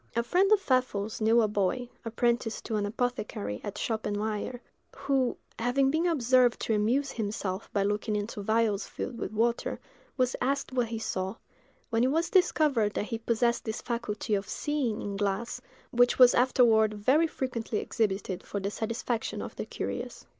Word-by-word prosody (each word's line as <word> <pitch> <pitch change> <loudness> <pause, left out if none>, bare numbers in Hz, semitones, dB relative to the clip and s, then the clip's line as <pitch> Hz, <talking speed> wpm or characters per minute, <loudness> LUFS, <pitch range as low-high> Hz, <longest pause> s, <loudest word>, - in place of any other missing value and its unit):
A 235 - +2
friend 370 - +2
of 430 - +6
Pfeffel's 250 - 0
knew 225 +2 +5
a - - +3
boy, 210 +4 0 0.2
apprenticed 235 0 -1
to 225 - -2
an 205 -1 0
apothecary 210 - -3
at 205 - -5
Schoppenweyer, 215 +2 -2 0.4
who, 265 -3 0 0.2
having 265 +3 +2
been 325 +4 +1
observed 255 -6 +3
to 225 - 0
amuse 240 +7 +1
himself 205 -3 -3
by 200 - +1
looking 210 +1 -1
into 205 0 -3
vials 220 -1 +1
filled 235 - -6
with - - -3
water, 230 +2 0 0.4
was 255 -1 +1
asked 275 +2 0
what 245 -2 +1
he 225 0 -4
saw; 190 -2 -3 0.6
when 230 +1 +2
it 255 - +3
was 330 +3 0
discovered 285 - +3
that - - -1
he 230 0 -4
possessed 235 +1 +1
this 220 -1 -3
faculty 235 -3 -3
of 200 0 -1
seeing 270 -5 -1
in 200 -1 -4
glass, 205 +3 -2 0.3
which 245 0 +4
was 250 -1 +8
afterward 230 -4 +4
very 265 +11 +3
frequently 240 -7 -3
exhibited 195 -4 -1
for 200 - -4
the 200 +1 -3
satisfaction 230 +1 -2
of - - -6
the - - -5
curious. - - -5
230 Hz, 170 wpm, -29 LUFS, 210-250 Hz, 0.6 s, was